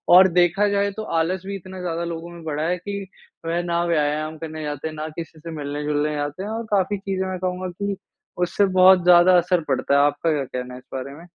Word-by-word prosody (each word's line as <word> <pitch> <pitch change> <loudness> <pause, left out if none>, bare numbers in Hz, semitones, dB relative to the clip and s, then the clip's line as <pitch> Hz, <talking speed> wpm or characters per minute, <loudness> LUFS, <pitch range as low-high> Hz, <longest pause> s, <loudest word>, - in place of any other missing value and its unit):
और 185 +1 +9
देखा 180 +3 +3
जाए 200 0 +1
तो 215 +2 -6 0.2
आलस 180 +3 -1
भी 200 +1 -4
इतना 185 0 -10
ज़्यादा 170 -1 -2
लोगों 170 0 -5
में 170 -1 -11
बढ़ा 155 -1 -2
है 180 - 0
कि 200 +3 -5 0.5
वह 170 +1 0
ना 170 0 0
व्यायाम 155 -1 0
करने 155 -1 -6
जाते 145 +1 -4
हैं, 155 - -7
ना 155 0 -4
किसी 165 -1 -7
से 165 +2 -8
मिलने-जुलने 150 0 -2
जाते 145 +5 -3
हैं 205 - -5
और 225 +1 -3
काफ़ी 200 0 +2
चीज़ें 190 -1 -3
मैं 185 -1 -4
कहूँगा 185 0 -2
कि 200 +3 -3 0.5
उससे 200 +3 +2
बहुत 185 -1 +7
ज़्यादा 180 +1 +7
असर 180 0 +2
पड़ता 135 +1 +1
है। - - +5
आपका 145 +3 +1
क्या 145 -2 0
कहना 125 -1 -6
है - - -9
इस 130 - -23
बारे 135 +1 -5
में? 165 - -13
170 Hz, 230 wpm, -23 LUFS, 150-185 Hz, 0.5 s, और